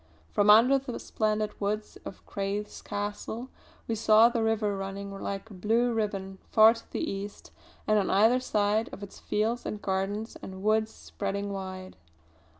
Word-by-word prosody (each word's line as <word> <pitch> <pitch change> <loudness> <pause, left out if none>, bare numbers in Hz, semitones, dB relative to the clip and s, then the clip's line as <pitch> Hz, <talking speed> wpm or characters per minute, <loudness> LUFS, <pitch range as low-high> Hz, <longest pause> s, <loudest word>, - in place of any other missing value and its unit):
From 205 0 +3
under 240 +6 +7
the 260 -2 -6
splendid 215 -1 -1
woods 210 +1 -2
of - - -9
Crathes 200 +1 -4
Castle 210 +4 -4 0.4
we 230 - -1
saw 220 +1 +6
the 235 -1 -1
river 220 -2 +1
running 195 +1 -5
like 195 +2 -5
a - - -9
blue 225 +6 +1
ribbon 195 -3 -3
far 220 +1 +7
to 230 - -13
the - - -2
east 200 +1 -6 0.3
and 215 0 +3
on 195 - 0
either 220 +6 +4
side 215 -2 +1
of 200 - -8
it 200 - -9
fields 225 +3 -1
and 210 - -4
gardens 200 +3 -2
and 190 0 -8
woods 220 +1 +2
spreading 200 -1 -4
wide. 185 -1 -7
210 Hz, 160 wpm, -28 LUFS, 195-220 Hz, 0.4 s, under